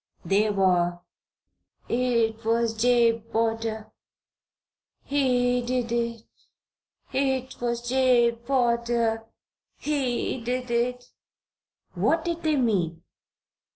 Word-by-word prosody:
They 200 +5 +2
were: 180 -3 +2 0.9
"It 235 -2 0
was 230 0 +1
Jabe 230 0 +3
Potter 225 -1 -1 1.1
he 250 -3 +1
did 245 -1 -2
it! 235 -1 -2 0.9
It 265 -1 -1
was 240 0 -2
Jabe 245 -2 +3
Potter 235 -3 +1 0.5
he 260 -4 -1
did 250 +1 -3
it!" 245 +1 0 0.9
What 325 0 +1
did 340 -1 -2
they 310 -1 +1
mean? 195 - 0
235 Hz, 85 wpm, -26 LUFS, 225-250 Hz, 1.1 s, Jabe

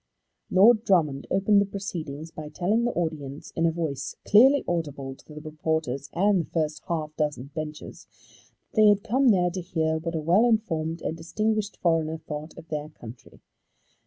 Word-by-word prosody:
Lord 215 +4 +6
Drummond 155 - +1
opened 200 +2 +3
the 200 - 0
proceedings 165 -6 -6
by 155 -2 -8
telling 200 +9 0
the 240 - +1
audience, 150 -5 -4
in 165 0 +2
a - - +2
voice 155 -5 -4
clearly 265 +7 +6
audible 145 -6 -3
to 150 - -16
the 150 - -8
reporters 155 -3 -3
and 195 +1 +3
the - - -10
first 155 -2 -2
half 155 -2 -3
dozen 150 -3 -2
benches, 155 -1 -7 0.6
that 215 - +2
they 215 - +7
had 205 -1 +4
come 255 +5 +2
there 180 -4 +3
to 185 +1 -4
hear 160 -3 -1
what 165 +1 -4
a - - 0
well 175 +9 +3
informed 165 -8 -1
and 160 - -3
distinguished 215 +5 -2
foreigner 160 -2 +1
thought 150 0 -8
of 165 - -12
their 150 -1 -4
country. 120 -5 -13
165 Hz, 175 wpm, -26 LUFS, 155-195 Hz, 0.6 s, they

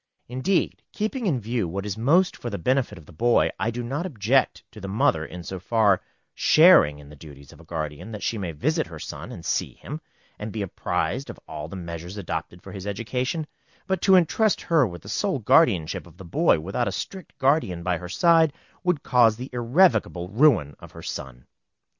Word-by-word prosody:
Indeed, 130 +10 0
keeping 220 +2 -2
in 145 -8 +1
view 115 -2 -2
what 95 +4 -4
is 100 -2 -3
most 160 +12 +3
for 120 - -6
the 100 - -4
benefit 125 +2 0
of 80 - -13
the - - -15
boy, 120 +9 +3
I 115 - 0
do 120 +1 -4
not 140 +9 -3
object 130 - +1
to 105 - -12
the 100 - -5
mother 95 -5 +2
in 90 +2 -8
so 95 +2 -6
far 100 -1 +2 0.3
sharing 155 - +6
in 75 -1 -13
the 75 - -12
duties 70 -1 -13
of - - -17
a - - -14
guardian 80 +4 -5
that 105 -2 -7
she 115 - -1
may 90 -4 -3
visit 75 - 0
her - - -9
son, - - -7
and - - -9
see - - -1
him, 150 +2 -8 0.4
and 105 +1 -5
be 105 -1 -3
apprised 95 - -2
of - - -8
all 75 - -6
the 85 - -9
measures 85 +1 -7
adopted 90 -2 -5
for - - -10
his 95 -1 -7
education; 125 - -2 0.4
but 190 -1 -1
to 190 - +6
intrust 190 +5 +3
her 160 -7 +3
with 85 -4 -9
the - - -12
sole - - 0
guardianship 80 -4 +3
of - - -18
the 95 - -10
boy 85 - +3
without 95 +9 -2
a - - -1
strict 190 -2 -7
guardian 130 - +1
by 90 -1 0
her 90 -1 -8
side, 165 - +4 0.3
would 180 -5 0
cause 115 -4 +4
the 130 +2 -7
irrevocable 120 - +2
ruin 105 - +3
of - - -13
her - - -11
son. 60 -2 -7
110 Hz, 205 wpm, -25 LUFS, 85-140 Hz, 0.4 s, sharing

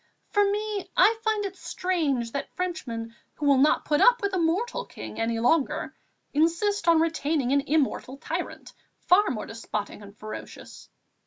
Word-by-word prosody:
For 410 - +4
me, 415 0 -2
I 445 +1 +5
find 435 -2 0
it 390 -1 -5
strange 305 -12 -1
that 280 - -4
Frenchmen, 240 -12 -4 0.2
who 295 - -4
will 280 -2 +5
not 295 +3 +3
put 295 -1 +2
up 485 -1 +6
with 400 -1 0
a 370 - +1
mortal 425 +10 0
king - - -9
any 225 0 0
longer, 270 +5 +1 0.4
insist 335 +5 +1
on 335 -1 +6
retaining 310 -4 0
an 280 0 +4
immortal 280 -3 0
tyrant, - - -5 0.3
far 405 +3 +4
more 215 -4 -3
despotic 215 -2 -5
and 200 0 -13
ferocious. 215 0 -9
320 Hz, 160 wpm, -26 LUFS, 255-395 Hz, 0.4 s, up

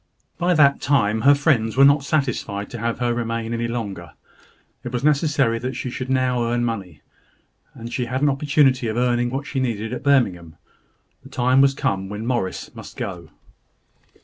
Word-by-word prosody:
By 175 0 +2
that 140 -2 +4
time 110 -6 +1
her 140 +4 +6
friends 130 -6 +1
were 135 - +7
not 140 0 +4
satisfied 125 -9 -2
to 120 - -6
have 115 +1 -2
her 120 -1 0
remain 115 -1 -3
any 115 0 -2
longer. 100 -8 -5 0.7
It 120 - -6
was 125 0 -3
necessary 145 -5 +2
that 130 +3 -4
she 125 - -4
should 130 +1 -5
earn 120 -2 +1
money; 95 -10 -5 0.7
and 115 +1 -8
she 125 - -1
had 130 +4 -3
an 145 - +4
opportunity 135 -3 +2
now 110 - -2
of - - -5
earning 120 0 +1
what 135 +3 -4
she 140 -1 -3
needed 115 -3 -2
at - - -5
Birmingham. 95 - +1 0.7
The - - -14
time 130 +2 +2
was 135 0 +3
come 95 -6 -2
when 105 +2 -6
Morris 120 -7 -3
must - - -11
go. 85 -4 -6
120 Hz, 180 wpm, -22 LUFS, 115-135 Hz, 0.7 s, were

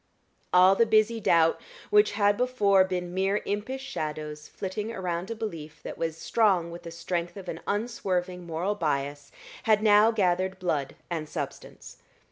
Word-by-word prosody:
All 185 +1 +7
the 230 +3 +3
busy 220 +1 +3
doubt 165 -5 +3 0.3
which 420 0 +5
had 205 0 +3
before 205 -6 +3
been 180 -2 -3
mere 195 +2 0
impish 235 +7 -3
shadows 150 - -5
flitting 210 +3 -5
around 180 -2 -3
a 230 - -3
belief 160 -8 -7
that - - -6
was 165 -1 -3
strong 185 -3 +2
with 170 +1 -8
the 170 - -8
strength 170 +2 -4
of 190 -2 -9
an 165 - -5
unswerving 185 -5 -2
moral 170 +5 -1
bias, 145 -5 -2 0.4
had 215 0 +4
now 210 0 +6
gathered 190 -3 +1
blood 150 -7 -2 0.2
and 155 -3 -3
substance. - - -7
185 Hz, 155 wpm, -27 LUFS, 170-210 Hz, 0.4 s, All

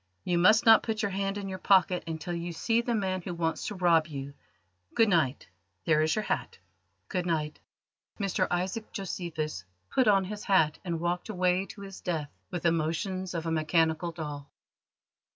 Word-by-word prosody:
You 175 -1 +1
must 215 +5 +5
not 225 -1 +8
put 220 -1 -2
your 200 - 0
hand 195 +1 -1
in 200 -1 -4
your 190 -1 -5
pocket 185 -2 +3
until 165 +2 -4
you 170 0 -4
see 225 +7 +1
the 235 0 -1
man 190 -3 -1
who 175 0 -5
wants 165 -1 -1
to 210 - -4
rob 170 -3 +3
you. 140 -2 -6 0.6
Good 225 -2 +5
night. 155 -8 +1 0.4
There 155 -1 +4
is 155 0 +2
your 215 - -1
hat." - - -2 0.5
"Good 180 -3 -2
night!" 155 -3 -1 0.6
Mr 195 -3 0
Isaac 190 +5 -2
Josephus 165 - -4 0.3
put 260 -3 +3
on 195 -2 +5
his 210 +2 -6
hat 160 -6 +3
and 170 -3 -2
walked 175 +4 -2
away 185 -1 +1
to 200 - -11
his 195 -1 -9
death 155 -5 -3 0.2
with 175 -2 -4
the 170 - +4
motions 175 +3 -2
of 165 -1 -3
a 165 - -1
mechanical 160 +1 +1
doll. 150 -4 -6
175 Hz, 185 wpm, -29 LUFS, 160-195 Hz, 0.6 s, not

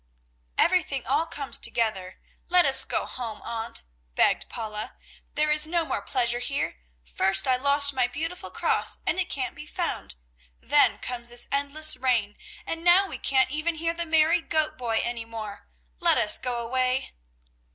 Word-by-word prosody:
"Everything 315 -8 +1
all 295 +5 0
comes 280 -3 -1
together; 195 -5 -2 0.3
let 360 0 +5
us 270 -1 +7
go - - -2
home, 230 -4 -6
Aunt," 230 0 -5 0.3
begged - - +2
Paula, 215 -2 -6 0.4
"there 300 +1 +2
is 300 0 +6
no 335 0 0
more - - -3
pleasure 240 -2 0
here. 275 - -3 0.3
First 195 - +2
I 260 - +3
lost 280 +2 +2
my 255 -2 +1
beautiful 330 +8 -5
cross, - - +2
and 370 - 0
it 370 - -1
can't 260 -2 -3
be 300 - -10
found; 335 - -4 0.4
then - - +3
comes 240 -1 -5
this 240 0 -2
endless 285 +3 +3
rain, 235 -6 0 0.3
and 330 0 -5
now 355 +3 +5
we - - -7
can't 265 0 +2
ever 315 +2 -1
hear 330 +1 -1
the 340 0 -4
merry 320 +2 +3
goat 315 -1 -1
boy 230 -3 -1
any 235 -1 -3
more. 220 - -8 0.3
Let - - +3
us 210 - +4
go 250 -2 -3
away!" 255 +2 -1
265 Hz, 165 wpm, -25 LUFS, 235-315 Hz, 0.4 s, us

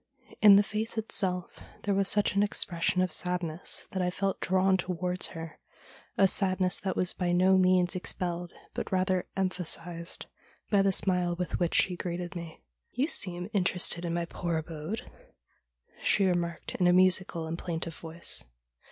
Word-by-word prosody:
In 205 -2 +9
the 200 - +6
face 215 +2 -4
itself 185 -5 -1 0.2
there 205 - 0
was 195 0 +1
such 205 0 +2
an 200 - +2
expression 185 -3 +2
of 185 - -2
sadness 175 0 0
that 190 - -2
I 180 - +1
felt 195 +2 -2
drawn 190 +1 +2
towards 180 0 -2
her, 165 -2 -9 0.6
a 195 - +6
sadness 185 -1 +2
that 190 - -3
was 180 - 0
by 180 -1 -1
no 185 +2 +4
means 185 -1 +3
expelled, 175 -1 -2 0.2
but - - -5
rather 185 -1 0
emphasised, 175 -2 -2 0.5
by 200 -2 +5
the 195 0 +3
smile 180 -2 +1
with 180 0 -3
which 175 -2 0
she 180 - +3
greeted 175 +1 -5
me. 170 -2 -8
' - - -51
You 280 - +3
seem 180 - +1
interested 180 -2 +2
in 170 -1 -2
my 170 0 -1
poor 170 -1 -3
abode,' 160 +8 -5 0.9
she 200 - +2
remarked 175 -2 -2
in 180 - +1
a 175 - +5
musical 185 -2 +3
and 160 +1 -4
plaintive 165 -1 -4
voice. 165 +1 -4
180 Hz, 165 wpm, -29 LUFS, 170-190 Hz, 0.9 s, In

